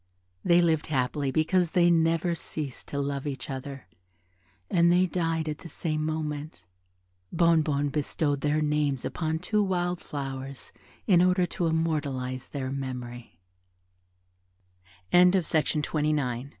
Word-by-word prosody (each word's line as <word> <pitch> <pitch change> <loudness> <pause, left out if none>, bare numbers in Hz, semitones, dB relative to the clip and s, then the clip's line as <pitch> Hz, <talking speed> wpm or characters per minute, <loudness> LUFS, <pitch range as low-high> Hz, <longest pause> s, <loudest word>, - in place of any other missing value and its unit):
They 175 0 +5
lived 160 -2 +1
happily 140 0 0
because 165 +4 +1
they 175 -1 +5
never 165 +1 +2
ceased 150 -5 -5
to 140 - -5
love 140 0 -2
each 135 -2 -5
other, 135 +1 -6 0.8
and 170 - +4
they 180 +1 +4
died 165 -3 -1
at 150 0 -3
the 170 - -10
same 155 -2 -2
moment. 155 -4 -4 0.7
Bonnebonne 155 -4 +2
bestowed 145 0 -1
their 150 +1 +1
names 150 -3 0
upon 160 -1 -2
two 210 +6 0
wild 180 -2 -1
flowers 135 -1 -6 0.3
in 180 -5 +5
order 180 0 +3
to 175 -1 -2
immortalize 145 -6 -1
their 135 -2 -4
memory. 125 -3 -6
155 Hz, 115 wpm, -27 LUFS, 140-170 Hz, 0.8 s, They